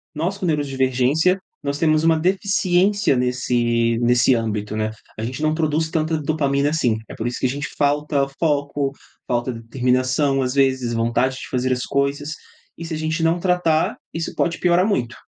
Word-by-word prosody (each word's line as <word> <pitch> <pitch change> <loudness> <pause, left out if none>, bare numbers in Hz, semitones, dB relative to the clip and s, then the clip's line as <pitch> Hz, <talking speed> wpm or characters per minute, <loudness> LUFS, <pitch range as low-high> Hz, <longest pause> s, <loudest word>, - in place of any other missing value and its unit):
Nós 175 +6 -2
com 190 - -4
neurodivergência, 145 +3 +1 0.2
nós 140 0 -2
temos 155 -1 +3
uma 165 -1 +4
deficiência 190 0 +2
nesse 120 -2 +1
nesse 120 +1 +4
âmbito, 105 -2 -2
né, 110 0 -1 0.3
a 110 - -3
gente 130 +5 -5
não 155 0 +2
produz 160 0 0
tanta 160 -1 0
dopamina 145 -2 +1
assim. 125 -8 +1
É - - -8
por 115 - -3
isso 120 - -4
que - - -1
a - - -2
gente 145 +2 -3
falta 145 0 +1
foco, 145 -3 0 0.4
falta 120 +1 0
determinação, 130 +4 0
às 125 -1 -1
vezes 130 -3 +1
vontade 120 +3 +1
de - - -8
fazer 130 0 -1
as 125 - -3
coisas 140 +2 -1 0.4
e 170 - -7
se 165 - -5
a - - -2
gente 160 +1 -2
não 165 +2 +2
tratar, 175 -3 +1 0.2
isso 165 0 -3
pode 170 -1 0
piorar 180 +1 +3
muito. 130 - -1
140 Hz, 175 wpm, -21 LUFS, 125-160 Hz, 0.4 s, uma